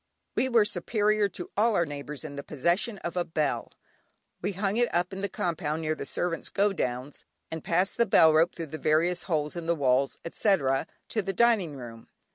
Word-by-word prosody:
We 260 Hz, -, +1 dB
were 230 Hz, -4 st, +5 dB
superior 210 Hz, +2 st, +1 dB
to 175 Hz, -, -8 dB
all 220 Hz, +1 st, +3 dB
our 170 Hz, -, +3 dB
neighbours 145 Hz, 0 st, -6 dB
in 145 Hz, -2 st, -7 dB
the 140 Hz, -, -4 dB
possession 170 Hz, -, 0 dB
of 170 Hz, -, -4 dB
a 180 Hz, -, +1 dB
bell. 155 Hz, -4 st, -2 dB, 0.7 s
We 200 Hz, +3 st, -1 dB
hung 200 Hz, +2 st, -1 dB
it 240 Hz, 0 st, +2 dB
up 175 Hz, +2 st, 0 dB
in 190 Hz, -, -5 dB
the 200 Hz, -, -1 dB
compound 160 Hz, -2 st, -2 dB
near 155 Hz, 0 st, 0 dB
the -, -, -6 dB
servants' 175 Hz, -1 st, -2 dB
"go 200 Hz, 0 st, +2 dB
downs," 130 Hz, -3 st, -3 dB, 0.3 s
and 160 Hz, -1 st, -5 dB
passed 180 Hz, +3 st, +1 dB
the 235 Hz, -, +3 dB
bell 160 Hz, -5 st, +6 dB
rope 165 Hz, +3 st, +3 dB
through 165 Hz, -, -4 dB
various 155 Hz, +3 st, +1 dB
holes 150 Hz, -2 st, 0 dB
in 170 Hz, -1 st, -5 dB
the 170 Hz, -, +2 dB
walls, 135 Hz, -2 st, +2 dB
etc., 160 Hz, -7 st, +1 dB, 0.2 s
to 220 Hz, -, 0 dB
the 195 Hz, 0 st, -3 dB
dining 205 Hz, -8 st, +3 dB
room. 115 Hz, -3 st, -10 dB
170 Hz, 200 wpm, -28 LUFS, 150-200 Hz, 0.7 s, bell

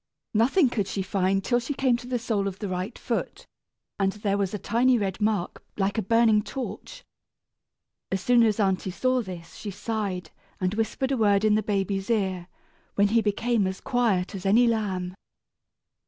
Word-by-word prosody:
Nothing 255 Hz, -, +4 dB
could 205 Hz, -5 st, -1 dB
she 195 Hz, 0 st, -2 dB
find, 195 Hz, 0 st, 0 dB
till 240 Hz, +4 st, +2 dB
she 260 Hz, +4 st, -4 dB
came 260 Hz, -3 st, +2 dB
to 245 Hz, +1 st, -10 dB
the 250 Hz, -1 st, 0 dB
sole 220 Hz, -4 st, -1 dB
of 190 Hz, -1 st, -4 dB
the 205 Hz, -, -4 dB
right 185 Hz, +4 st, -4 dB
foot, -, -, -3 dB, 0.5 s
and 195 Hz, -1 st, +2 dB
there 205 Hz, -1 st, -1 dB
was 200 Hz, -2 st, 0 dB
a 210 Hz, -, -3 dB
tiny 245 Hz, +4 st, +2 dB
red 195 Hz, -1 st, -2 dB
mark 210 Hz, -4 st, -1 dB
like 200 Hz, +1 st, 0 dB
a -, -, +1 dB
burning 225 Hz, +1 st, +4 dB
torch. 270 Hz, -, -7 dB, 1.1 s
As 190 Hz, -, 0 dB
soon 245 Hz, +4 st, +4 dB
as 220 Hz, -2 st, +3 dB
aunty 190 Hz, -2 st, +1 dB
saw 255 Hz, +7 st, +1 dB
this 180 Hz, -5 st, -9 dB
she 210 Hz, -, -7 dB
sighed, 195 Hz, -4 st, -3 dB, 0.3 s
and 185 Hz, 0 st, 0 dB
whispered 225 Hz, +5 st, -1 dB
a 270 Hz, -, +1 dB
word 205 Hz, -2 st, +3 dB
in 215 Hz, -, +4 dB
the 215 Hz, -, +3 dB
baby's 195 Hz, -1 st, -1 dB
ear, 190 Hz, -6 st, 0 dB, 0.5 s
when 205 Hz, 0 st, +3 dB
he 230 Hz, +2 st, +3 dB
became 220 Hz, 0 st, +1 dB
as 190 Hz, 0 st, -4 dB
quiet 220 Hz, -8 st, 0 dB
as 190 Hz, -2 st, -6 dB
any 215 Hz, +5 st, +5 dB
lamb. 195 Hz, -6 st, -1 dB
210 Hz, 185 wpm, -26 LUFS, 195-235 Hz, 1.1 s, any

